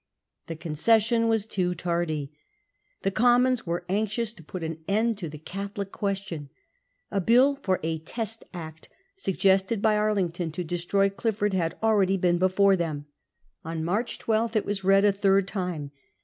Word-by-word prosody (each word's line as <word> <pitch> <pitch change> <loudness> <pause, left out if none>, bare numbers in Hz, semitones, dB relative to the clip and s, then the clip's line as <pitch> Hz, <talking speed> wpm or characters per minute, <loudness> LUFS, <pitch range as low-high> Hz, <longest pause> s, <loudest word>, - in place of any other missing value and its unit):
The 165 - -5
concession 220 +9 +2
was 225 -2 +1
too 180 -4 -1
tardy. 170 -4 -2 0.7
The 195 - +1
Commons 245 +1 +3
were 170 +1 -2
anxious 215 +3 -1
to 170 - -15
put 170 +3 -7
an 160 0 -4
end 220 +2 +1
to 170 -5 -4
the 150 - -9
Catholic 200 +4 -6
Question. 195 -8 -4 0.6
A 200 - 0
bill 255 +8 +4
for 190 -6 0
a 160 0 -1
Test 225 +7 -4
Act, 160 -3 -9 0.3
suggested 195 - +2
by 215 +1 +3
Arlington 190 -5 0
to 180 - -3
destroy 175 +4 +1
Clif 220 +2 -1
ford, 205 -1 0
had 170 -3 -1
already 200 -3 +3
been 175 -1 +2
before 190 +2 +4
them. 155 -5 -3 0.6
On 165 -1 -4
March 210 +8 -1
12 225 +1 0
it 215 - +1
was 200 -1 -2
read 195 +1 +5
a 205 - +6
third 195 -1 +2
time. 180 -8 -4
195 Hz, 165 wpm, -26 LUFS, 170-215 Hz, 0.7 s, a